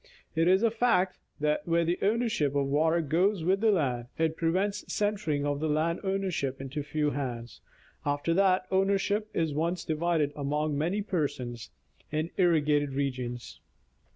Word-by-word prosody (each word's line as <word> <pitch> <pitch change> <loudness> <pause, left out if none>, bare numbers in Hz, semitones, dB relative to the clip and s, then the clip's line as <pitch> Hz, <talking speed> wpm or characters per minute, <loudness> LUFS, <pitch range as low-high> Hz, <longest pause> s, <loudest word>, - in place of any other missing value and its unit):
It 165 +1 +3
is 190 +4 +4
a 230 - +4
fact, 215 -6 +1 0.2
that 150 +1 0
where 170 0 +2
the 175 +2 0
ownership 210 - +1
of 140 -1 +2
water 160 +4 +2
goes 170 +5 +1
with 190 +3 +2
the 225 - +4
land, 130 - 0
it 160 0 +1
prevents 190 +5 0
centering 200 -9 0
of 145 0 -1
land 155 +2 0
ownership 190 -9 -1
into 135 +2 -4
few 150 0 -1
hands, 120 -5 -5 0.4
after 145 +3 0
that 185 0 +3
ownership 200 +2 +1
is 160 -3 0
once 170 +4 -1
divided 155 -2 0
among 150 +1 -1
many 175 +8 0
persons, 130 - -3 0.4
in 155 +2 -2
irrigated 150 -5 +2
regions. 125 -3 -3
160 Hz, 150 wpm, -29 LUFS, 145-190 Hz, 0.4 s, is